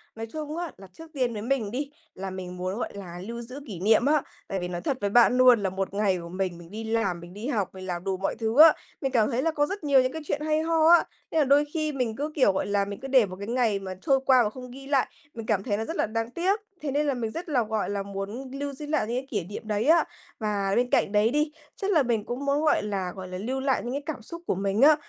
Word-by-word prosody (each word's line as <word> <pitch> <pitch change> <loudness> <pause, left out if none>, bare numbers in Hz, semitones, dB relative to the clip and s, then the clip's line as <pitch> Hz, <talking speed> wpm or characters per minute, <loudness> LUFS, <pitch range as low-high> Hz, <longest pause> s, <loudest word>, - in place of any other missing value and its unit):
Nói 225 - -5
chung 310 +1 -4
á, 345 -3 -3
là 195 0 -12
trước 325 - -12
tiên 250 -4 0
với 210 - -4
mình 235 -4 -1
đi, 275 +4 -3 0.2
là 190 +1 -5
mình 180 -1 -7
muốn, 185 +3 -3
gọi - - -2
là, 180 -3 -8
lưu 235 0 -5
giữ 255 +4 -8
kỷ 190 -6 -6
niệm 220 +6 +4
á. 300 +1 +4 0.3
Tại 195 - -2
vì 180 - -3
nói 175 -1 -4
thật 260 +8 -1
với 200 - +1
bạn 240 +3 +5
luôn 250 -4 +6
là 190 - +1
một 190 +1 -3
ngày 200 -3 +2
của 170 - -8
mình, 185 -1 -2
mình 170 0 -13
đi 220 +2 -5
làm, 220 -6 0
mình 175 +1 -11
đi 210 +5 -6
học, 210 -10 0
mình 185 0 -8
làm 175 -1 -3
đủ 190 -1 -1
mọi 195 - -1
thứ 225 +2 -1
á. 320 -1 +10 0.3
Mình 270 - -1
cảm 225 -4 +3
thấy 245 +1 0
là 325 +3 +1
có 290 -1 +1
rất 395 +3 -5
nhiều 280 -3 +5
những 255 - 0
cái 320 - -5
chuyện 290 - -2
hay 310 0 +1
ho 320 -1 +2
á. 345 0 +7 0.3
Nên 320 - +2
là 300 - +4
đôi 285 +2 +5
khi 310 -2 0
mình 250 -6 -2
cứ, 295 +4 -3
kiểu, 260 -9 +5
gọi - - -1
là, 200 -1 +1
mình 200 0 -6
cứ 270 - -6
để 260 -4 +5
một 185 -2 -8
cái 200 - -6
ngày 230 -4 +1
mà 190 -1 -6
trôi 270 +6 +3
qua 255 -2 +6
mà 210 - 0
không 250 +2 -10
ghi 270 +2 -10
lại, 275 -2 +2 0.3
mình 225 -1 -7
cảm 205 -3 +1
thấy 205 -3 -1
nó 220 - -2
rất 325 - -4
là - - +1
đáng 225 +2 -3
tiếc. 375 - +1 0.2
Thế 295 -2 -2
nên 295 +2 +1
là 280 - +2
mình 230 -3 -3
rất 335 +5 -6
là, 255 -5 +2
gọi 220 -2 -2
là, 200 -1 -2
muốn 200 +7 -6
lưu 280 +1 -4
giữ 295 +3 -7
lại 300 -6 0
những 240 +2 -1
cái 265 +1 -4
kỷ 205 -6 -1
niệm 205 +4 -8
đấy 210 0 0
á. 330 +3 +6 0.4
Và 205 -3 0
bên 245 +1 +2
cạnh - - +2
đấy 210 +1 +4
đi, 300 +3 +1 0.2
chắc 400 +1 -2
là 315 -7 +4
mình 230 -4 0
cũng 250 +4 -4
muốn, 280 +1 +2
gọi 310 - +3
là, 195 -3 -2
gọi 190 -1 -7
là, 185 0 -6
lưu 250 +8 -2
lại 265 -1 +1
những 240 +2 -4
cái 285 +1 -3
cảm 295 -6 -4
xúc 335 +10 -9
của - - +1
mình 195 +3 0
á. 300 +2 +8
235 Hz, 305 wpm, -27 LUFS, 200-280 Hz, 0.4 s, á